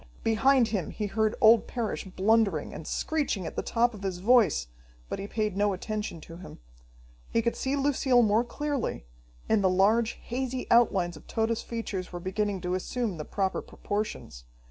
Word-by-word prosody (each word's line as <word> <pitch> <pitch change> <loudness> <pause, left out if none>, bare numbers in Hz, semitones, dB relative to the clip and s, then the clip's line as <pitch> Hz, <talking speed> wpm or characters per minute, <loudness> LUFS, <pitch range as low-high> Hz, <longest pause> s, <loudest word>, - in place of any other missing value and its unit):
Behind 235 +2 +3
him 195 -7 -2
he 210 - -4
heard 215 +1 0
old 225 0 +6
Parrish 235 -4 -3
blundering, 195 -3 +1
and 155 - -8
screeching 285 - -1
at - - -6
the - - -1
top 240 +1 +1
of 205 - -10
his 190 -2 -3
voice, 205 - +4 0.4
but - - -4
he 195 - -5
paid 215 -2 -2
no 205 0 +2
attention 210 -2 -4
to 165 +2 -11
him. 180 - -11 0.7
He 230 - +1
could 235 - 0
see 270 +1 -1
Lucille 270 -3 +3
more 215 +2 +3
clearly, 280 - -3 0.4
and 215 -2 +2
the 190 - +4
large, 215 +5 +3
hazy 255 +1 -4
outlines 190 -8 +3
of - - -16
Tode's 225 0 0
features 210 -6 -5
were 175 - -5
beginning 195 +1 -2
to 180 0 -2
assume 205 +1 -2
the 150 - -5
proper 195 -2 -1
proportions. 205 - -5
215 Hz, 175 wpm, -28 LUFS, 190-235 Hz, 0.7 s, old